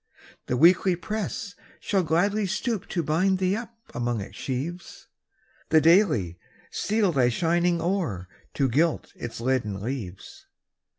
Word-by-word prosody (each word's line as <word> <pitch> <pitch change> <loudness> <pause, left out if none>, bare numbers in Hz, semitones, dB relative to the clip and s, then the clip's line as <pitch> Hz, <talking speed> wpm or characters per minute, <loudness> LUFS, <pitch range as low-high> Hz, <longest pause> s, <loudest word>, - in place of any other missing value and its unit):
The 125 - 0
Weekly 180 +4 +5
press 210 +4 -4 0.3
shall 195 -2 +1
gladly 195 +6 +1
stoop 210 +1 -2
To 170 - -2
bind 185 +6 +2
thee 185 +1 +1
up 230 +1 -7 0.2
among 120 -1 -1
its 100 -1 -8
sheaves; 145 +10 -5 0.6
The 160 - +6
Daily 155 - +3 0.3
steal 210 -2 +1
thy 130 -5 +3
shining 170 +6 +1
ore, 165 - -2 0.3
To 135 - +2
gild 155 +7 0
its 120 - -7
leaden 115 -5 -1
leaves. 105 -5 -7
165 Hz, 130 wpm, -26 LUFS, 125-190 Hz, 0.6 s, The